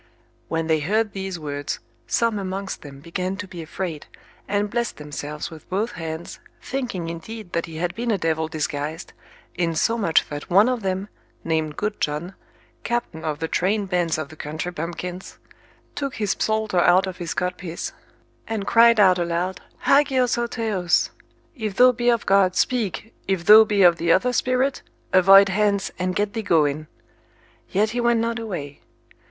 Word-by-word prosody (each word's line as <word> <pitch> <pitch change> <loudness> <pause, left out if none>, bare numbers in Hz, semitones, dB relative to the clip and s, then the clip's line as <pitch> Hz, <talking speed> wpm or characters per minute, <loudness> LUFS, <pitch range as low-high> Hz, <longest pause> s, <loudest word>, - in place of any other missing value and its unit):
When 165 0 -1
they 160 -1 +2
heard 210 +8 0
these 190 -2 -4
words, 145 -2 -4 0.3
some 230 -3 +1
amongst 195 0 -4
them 140 -3 -11
began 185 +4 -3
to 205 -1 -6
be 175 -2 -8
afraid, 160 -1 -5 0.4
and 205 +1 0
blessed 235 +2 -2
themselves 150 +1 -6
with 160 -1 -13
both 205 +5 -1
hands, 160 0 -6 0.2
thinking 240 -10 -4
indeed 175 +4 -7
that 170 - -1
he 165 - -9
had 175 +2 -1
been 235 +1 -3
a 215 - +2
devil 160 -2 0
disguised, 155 +1 -4 0.4
insomuch 170 +2 +1
that 145 0 -6
one 200 +6 +6
of 250 -2 0
them, 190 0 -2 0.4
named 160 -2 -1
Good 210 0 -3
John, 155 +5 -2 0.5
captain 235 -9 -3
of 155 -2 -2
the 160 +1 -3
trained 195 +3 0
bands 175 -3 +1
of 155 -3 -4
the 155 - -12
country 155 +4 -5
bumpkins, 175 +2 -6 0.6
took 275 -2 -4
his 210 -3 0
psalter 215 -4 +1
out 180 +2 +5
of 185 -1 -6
his 170 -2 -4
codpiece, 180 -2 -3 0.5
and 220 -3 -3
cried 230 0 +6
out 185 -3 +6
aloud, 175 +2 -2 0.2
Hagios 270 -3 +3
ho 240 0 0
theos. 215 -7 0 0.4
If 215 -6 -4
thou 250 +2 +7
be 240 0 0
of 235 -2 +1
God, 195 -2 +4
speak; 225 -1 -1
if 190 -3 -1
thou 220 +1 +9
be 205 -2 +2
of 175 -2 +6
the 170 0 +1
other 250 +8 +3
spirit, 255 +2 +1 0.3
avoid 195 +1 +8
hence, 200 0 +1
and 185 0 -1
get 205 0 0
thee 225 - -2
going. 155 -6 +1 0.8
Yet 215 +3 +1
he 240 +1 -1
went 235 -1 +3
not 230 +1 -1
away. 175 -11 -6
185 Hz, 170 wpm, -23 LUFS, 165-220 Hz, 0.8 s, thou